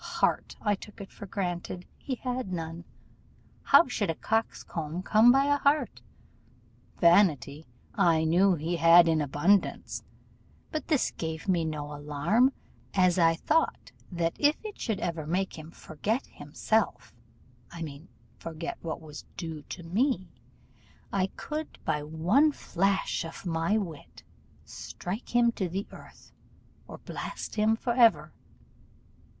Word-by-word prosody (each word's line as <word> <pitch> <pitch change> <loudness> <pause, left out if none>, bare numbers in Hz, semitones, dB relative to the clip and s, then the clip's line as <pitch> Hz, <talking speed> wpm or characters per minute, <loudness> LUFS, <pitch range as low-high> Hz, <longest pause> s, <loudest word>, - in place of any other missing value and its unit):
Heart, - - +1
I 210 - +3
took 205 +1 -9
it 200 - -9
for 205 - -10
granted, 180 -1 -4
he 265 - -4
had 250 -4 -4
none; 165 0 -5 0.8
how - - +6
should 220 -6 -2
a 165 - 0
coxcomb 180 -6 -2
come 220 +4 +6
by 270 +2 +4
a 285 0 +3
heart? 285 +2 +1 1.0
Vanity 160 -5 +3 0.3
I 165 -2 +3
knew 180 +4 +4
he 165 +2 -2
had 165 +1 +7
in 160 -1 +2
abundance, 150 +8 +1 0.7
but 310 -2 -4
this 300 -6 +1
gave 160 +2 -5
me 175 -4 +2
no 150 -2 -4
alarm, 150 - +2 0.4
as 185 -2 +4
I 165 -1 +5
thought 320 - 0 0.2
that 170 -1 -1
if 295 +1 +4
it 425 - -7
should 220 -5 -1
ever 165 -3 -3
make 185 +1 -1
him 155 +1 -10
forget 205 - -3
him 145 0 -14
self, 210 - 0 0.6
I 170 -1 -7
mean 150 +2 -9 0.3
forget 165 0 -6
what 165 0 -5
was 150 -2 -10
due 160 -3 -5
to 175 - -7
me, 200 - 0 0.8
I 190 -1 +2
could, 310 +1 -5
by 150 - 0
one 175 - +3
flash 195 -3 0
of 165 +3 -9
my 165 +4 +1
wit, 165 -9 -7 0.4
strike 205 +7 -7
him 240 -1 +5
to 190 -6 -3
the 195 +4 -3
earth, - - -15 0.6
or - - -9
blast - - -6
him 215 +1 +2
for 240 +1 -2
ever. 235 -2 +4
175 Hz, 140 wpm, -28 LUFS, 160-220 Hz, 1.0 s, had